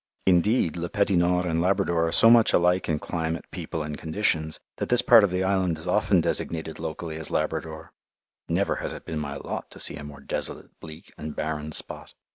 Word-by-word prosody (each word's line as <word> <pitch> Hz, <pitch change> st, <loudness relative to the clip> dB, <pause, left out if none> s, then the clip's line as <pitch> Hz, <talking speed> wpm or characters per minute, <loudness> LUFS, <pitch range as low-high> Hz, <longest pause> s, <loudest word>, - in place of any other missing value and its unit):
Indeed, 90 Hz, 0 st, +2 dB
Le 85 Hz, 0 st, -3 dB
Petit 100 Hz, 0 st, +1 dB
Nord 90 Hz, +1 st, +2 dB
and 85 Hz, -1 st, 0 dB
Labrador 90 Hz, -3 st, +1 dB
are -, -, -2 dB
so 115 Hz, +6 st, +6 dB
much 115 Hz, -2 st, +5 dB
alike 90 Hz, +1 st, +2 dB
in 80 Hz, -, +1 dB
climate, 80 Hz, +1 st, -4 dB
people, 80 Hz, -, -5 dB
and 75 Hz, 0 st, -5 dB
conditions 80 Hz, -2 st, 0 dB, 0.2 s
that -, -, -3 dB
this 125 Hz, 0 st, +4 dB
part 115 Hz, -3 st, +7 dB
of 100 Hz, -, +3 dB
the 90 Hz, +1 st, -1 dB
island 95 Hz, -3 st, +1 dB
is 80 Hz, -, -8 dB
often 95 Hz, -1 st, +2 dB
designated 80 Hz, 0 st, -2 dB
locally 80 Hz, -2 st, -5 dB
as 80 Hz, -, -2 dB
Labrador 80 Hz, 0 st, -3 dB, 0.6 s
(never -, -, 0 dB
has -, -, -4 dB
it -, -, -10 dB
been 80 Hz, -, -4 dB
my 70 Hz, -1 st, -5 dB
lot -, -, -6 dB
to -, -, -13 dB
see -, -, +3 dB
a 75 Hz, -, -8 dB
more 75 Hz, -1 st, -10 dB
desolate, -, -, -3 dB
bleak, 80 Hz, +1 st, -12 dB
and 75 Hz, -1 st, -6 dB
barren 75 Hz, 0 st, -3 dB
spot). -, -, -5 dB
85 Hz, 205 wpm, -25 LUFS, 80-95 Hz, 0.6 s, part